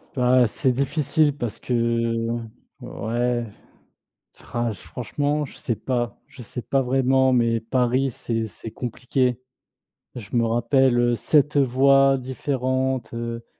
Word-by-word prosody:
Bah 125 -1 +4
c'est 130 +4 0
difficile 145 +3 +1
parce 120 -6 -4
que, 115 -1 0 0.4
ouais. 120 +1 -2 1.1
Ah, 120 -1 0
franchement 145 - -3
je 135 - -11
sais 120 - -2
pas 120 -1 -2
je 130 - -12
sais 120 +2 -7
pas 135 +2 +1
vraiment, 130 +1 +2
mais 115 -2 +2
Paris 125 +3 +1
c'est 115 -1 -3
c'est 110 - -10
compliqué. 125 0 -1 0.7
Je 115 -2 -6
me 115 - +3
rappelle, 120 +2 +2
heu, 120 0 +3
7 150 +4 +2
voies 135 +1 +4
différentes, 130 -1 -2
heu, 115 0 -5
125 Hz, 125 wpm, -23 LUFS, 115-135 Hz, 1.1 s, Bah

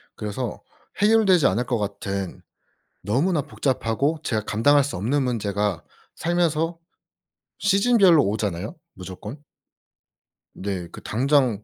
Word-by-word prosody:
그래서 105 +2 -4 0.4
해결되지 205 -7 +5
않을 115 +7 0
것 120 0 0
같은 100 -2 -4 0.6
너무나 145 - +1
복잡하고 135 +3 -1
제가 110 -3 -1
감당할 140 +6 +4
수 140 - -4
없는 130 +8 0
문제가 105 -6 -1 0.3
살면서 165 -1 0 0.8
시즌별로 195 - +5
오잖아요 100 -2 -2 0.2
무조건. 95 - -8 1.2
네. 95 -3 -4
그 - - -10
당장 125 -3 +1
125 Hz, 250 characters per minute, -23 LUFS, 105-155 Hz, 1.2 s, 해결되지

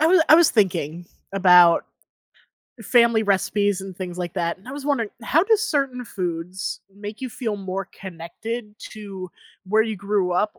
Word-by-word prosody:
I 315 - +4
wa 360 0 +5
I 310 - +9
was 340 -1 +6
thinking 175 -5 0 0.3
about 180 -3 +6 1.0
family 235 0 +4
recipes 205 0 +1
and 190 -1 -9
things 180 -2 -6
like 175 -2 -4
that, 170 -2 -2
and 195 - -17
I 260 - -6
was 285 -1 -7
wondering, 235 -8 0
how 300 +8 +3
do 445 +2 +4
certain 275 - -1
foods 180 -2 -4
make 205 +3 -8
you 260 - -4
feel 225 -3 -4
more 195 0 -4
connected 205 +5 -7 0.2
to 195 -4 -8 0.4
where 215 +3 +3
you 220 -1 -3
grew 200 -2 0
up 210 +4 0
205 Hz, 170 wpm, -23 LUFS, 185-235 Hz, 1.0 s, I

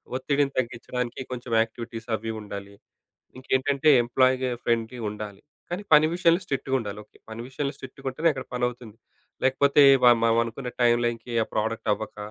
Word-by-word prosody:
ఒత్తిడిని 140 +1 0
తగ్గించడానికి 125 0 -3
కొంచెం 125 -1 -6
యాక్టివిటీస్ 115 0 -6
అవి 110 +1 -5
ఉండాలి. 100 -1 -8 0.6
ఇంకేంటంటే 135 +3 +1
ఎంప్లాయీగ 130 +2 +2 0.2
ఫ్రెండ్‌లి 115 +1 -1
ఉండాలి. 105 -1 -8 0.3
కానీ 180 +4 -4
పని 155 +1 +7
విషయంలో 175 0 +3
స్ట్రిక్ట్‌గుండాలి. 130 -8 -2
ఓకే. - - -25
పని 110 +1 -7
విషయంలో 140 +2 -3
స్ట్రిక్ట్‌గా 130 0 -10
ఉంటేనే 165 +5 +2
అక్కడ 130 -2 -6
పనవుతుంది. 120 -3 -3 0.5
లేకపోతే 140 +2 +4 0.2
వ - - +7 0.2
మ-మనమనుకున్న 115 +2 0
టైమ్ 120 0 +4
లైన్‌కి 120 +1 -3
ఆ - - -9
ప్రొడక్ట్ 110 +1 -2
అవ్వక, 110 0 -7
125 Hz, 140 wpm, -25 LUFS, 115-135 Hz, 0.6 s, పని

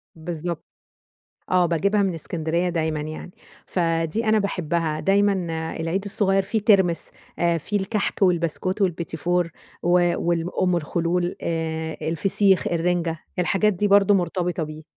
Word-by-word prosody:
بالضبط. 170 0 -5 0.9
آه، 180 -1 +4
باجيبها 200 +5 +1
من 190 -3 0
إسكندرية 165 +2 -1
دايمًا 160 -3 -1
يعني. 155 +3 -6 0.4
فدي 165 +4 0
أنا 215 0 +3
باحبها 165 -5 -1
دايمًا 200 +4 +3 0.5
العيد 175 +5 -1
الصغير 195 -1 +2
فيه 220 +3 -1
ترمس 190 -5 +3 0.3
آآ، 170 -1 +2
فيه 205 +7 -2
الكحك 200 +1 -2
والبسكوت 180 +2 +1
والبيتيفور 170 -1 0 0.3
و 175 - +1 0.3
وال 170 0 0
أم 180 -1 +2
الخلول 170 +2 -1
آآ، 160 -1 -2
الفسيخ، 190 +4 +2
الرنجة، 170 -1 0 0.2
الحاجات 200 +4 +2
دي 205 +3 0
برضو 200 0 +5
مرتبطة 175 -1 -1
بيه. 155 0 -6
175 Hz, 130 wpm, -23 LUFS, 165-195 Hz, 0.9 s, برضو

